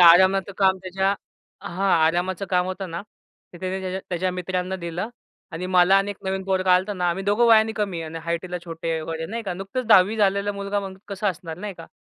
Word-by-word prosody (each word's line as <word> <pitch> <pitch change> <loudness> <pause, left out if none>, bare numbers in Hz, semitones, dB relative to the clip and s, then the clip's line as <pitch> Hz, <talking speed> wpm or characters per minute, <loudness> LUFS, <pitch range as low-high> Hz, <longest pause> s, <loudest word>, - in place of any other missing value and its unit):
आरामाचं 190 +3 +6
काम 190 -1 +4
त्याच्या 190 +2 0 0.5
हां, 195 +2 0
आरामाचं 180 +3 0
काम 180 -1 +2
होतं 185 -1 -5
ना? 170 +3 -4 0.5
ते 175 - -11
त्याने 190 +1 -2
त्याच्या 185 0 -3
त्याच्या 180 +1 -1
मित्रांना 185 +1 -2
दिलं 175 +4 -4 0.4
आणि 180 +3 -4
मला 185 +1 +5
अनेक 200 0 -2
नवीन 190 0 -2
पोरगं 190 -1 +1
आल्ताना, 180 -1 +2
आम्ही 190 +3 -3
2घं 210 +4 +3
वयाने 220 -1 +5
कमी 180 -5 -1
आणि 160 +1 -6
हाईटला 175 +1 -2
छोटे 165 -1 -3
वगैरे, 160 0 -4
नाही 230 +4 -4
का. 185 -4 -3
नुकतंच 195 +7 -4
10वी 210 0 +6
झालेला 200 0 +2
मुलगा 200 0 -2
म्हणजे 190 -1 -8
कसं 200 +1 -3
असणार 165 -2 -8
नाही 205 -1 -5
का.eee 165 - -12
185 Hz, 195 wpm, -24 LUFS, 175-195 Hz, 0.5 s, आरामाचं